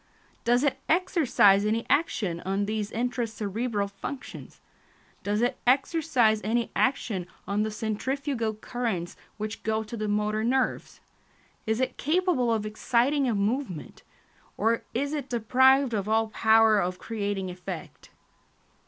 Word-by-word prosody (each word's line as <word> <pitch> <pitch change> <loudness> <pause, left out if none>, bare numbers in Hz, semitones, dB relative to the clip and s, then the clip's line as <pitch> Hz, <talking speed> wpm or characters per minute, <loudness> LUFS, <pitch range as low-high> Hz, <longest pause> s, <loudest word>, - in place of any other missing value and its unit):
Does 245 +2 +3
it 285 - +1
exercise 310 - +4
any 220 +2 0
action 230 - 0
on 195 +3 -1
these 210 0 -2
intra 245 0 -1
cerebral 215 0 -2
functions? 200 +7 -8 0.6
Does 210 +3 0
it 245 - 0
exercise 260 -5 +3
any 230 +2 0
action 215 -9 0 0.2
on 200 +1 0
the 215 - 0
centrifugal 225 +2 -2
currents 215 -6 -3 0.2
which 215 0 -5
go 220 0 -1
to 220 +2 -8
the 215 -1 -3
motor 210 +1 0
nerves? 260 +3 -1 0.7
Is 220 +1 +1
it 260 - -1
capable 315 -6 +1
of 220 -2 0
exciting 245 +6 +1
a 225 - 0
movement? 205 - -2 0.6
or 225 +2 +1
is 280 +4 -1
it 285 -3 -4
deprived 255 +3 +4
of 205 -1 -1
all 220 0 +2
power 220 -1 +4
of 180 -1 -1
creating 200 -4 -3
effect? 180 -2 -8
225 Hz, 135 wpm, -27 LUFS, 210-255 Hz, 0.7 s, exercise